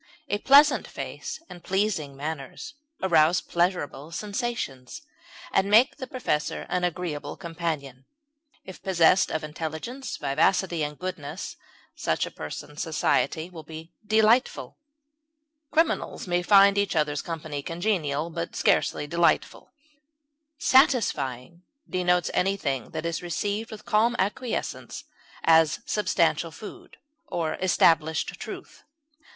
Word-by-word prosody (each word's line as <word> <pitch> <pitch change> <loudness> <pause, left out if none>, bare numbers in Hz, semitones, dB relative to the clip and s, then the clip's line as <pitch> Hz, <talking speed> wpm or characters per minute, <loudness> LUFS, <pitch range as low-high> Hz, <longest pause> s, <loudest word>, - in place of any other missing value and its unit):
A 205 - 0
pleasant 285 +5 +6
face - - -6
and 175 -1 -12
pleasing 190 -8 -1
manners 155 - -6 0.3
arouse 165 -1 +4
pleasurable 170 -4 -1
sensations, 200 - -4 0.5
and 195 +1 +2
make 230 +6 +5
the 260 -3 -6
possessor 150 -12 -2
an 180 - 0
agreeable 170 -4 -3
companion; 160 -7 -4 0.6
if 190 - -10
possessed 185 -1 +4
of 155 - -2
intelligence, 160 - -5
vivacity, 175 +4 +1
and 150 0 -4
goodness, 180 -6 -6 0.4
such - - 0
a - - -8
person's 145 - -7
society 160 0 0
will 165 -3 -9
be 160 +1 -10
delightful. 220 +4 +2 0.9
Criminals 325 +1 0
may 175 -1 +1
find 200 +1 +6
each 200 -3 0
other's 150 -2 +1
company 155 -3 -5
congenial, 165 -3 -1
but 170 0 -5
scarcely - - +2
delightful. 170 +3 +1 0.9
Satisfying 175 - +2 0.3
denotes 180 -1 +1
anything 180 - 0
that 160 0 -5
is 170 -1 -2
received 205 +5 -2
with 215 -1 -10
calm 225 +3 +2
acquiescence, 220 +5 -3 0.4
as 160 -1 +4
substantial 170 -5 +1
food, 205 +6 -11 0.3
or 165 - -2
established 160 -3 +3
truth. - - -9
170 Hz, 110 wpm, -26 LUFS, 155-200 Hz, 0.9 s, pleasant